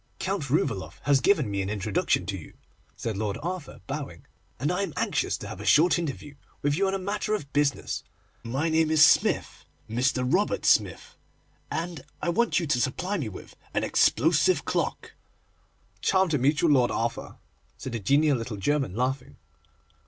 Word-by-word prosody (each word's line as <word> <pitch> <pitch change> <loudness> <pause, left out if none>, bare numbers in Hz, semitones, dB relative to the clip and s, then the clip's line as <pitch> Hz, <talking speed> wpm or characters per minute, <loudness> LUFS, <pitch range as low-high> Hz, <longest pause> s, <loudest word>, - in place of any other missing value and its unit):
'Count 190 -8 -3
Rouvaloff 95 - -1
has 140 -1 +3
given 150 - +2
me 100 -1 -1
an 95 - -3
introduction 105 -3 0
to 100 +1 -3
you,' 85 - -10 0.4
said 115 -3 -4
Lord 105 -1 -2
Arthur, 180 -3 -5
bowing, 135 - -6 0.3
'and - - 0
I - - -1
am - - -3
anxious - - 0
to - - -8
have - - -8
a - - -7
short 170 +4 +4
interview 145 -3 -5 0.3
with 145 0 +2
you 195 +4 +1
on 190 - 0
a - - 0
matter 205 +2 -2
of 140 -9 -7
business. 145 -1 0 0.4
My 130 +7 -2
name 160 -1 +2
is 155 0 +7
Smith, - - +2 0.2
Mr. 125 +3 0
Robert 185 +10 +1
Smith, - - +2 0.5
and 165 -3 -4 0.2
I - - -2
want 230 +3 +2
you 170 - -2
to 130 -5 +1
supply 180 - -1
me 125 -8 -3
with 95 - -11 0.2
an - - +1
explosive - - +3
clock.' - - -2 0.9
'Charmed 190 -3 +2
to 150 - +1
meet 145 +4 +2
you, 170 - +4
Lord 130 -5 +4
Arthur,' 115 +1 -3 0.4
said 130 - -6
the 115 - -3
genial 140 +5 +3
little 115 -2 -5
German, 135 -1 0
laughing. 130 +2 -2
140 Hz, 175 wpm, -26 LUFS, 115-165 Hz, 0.9 s, is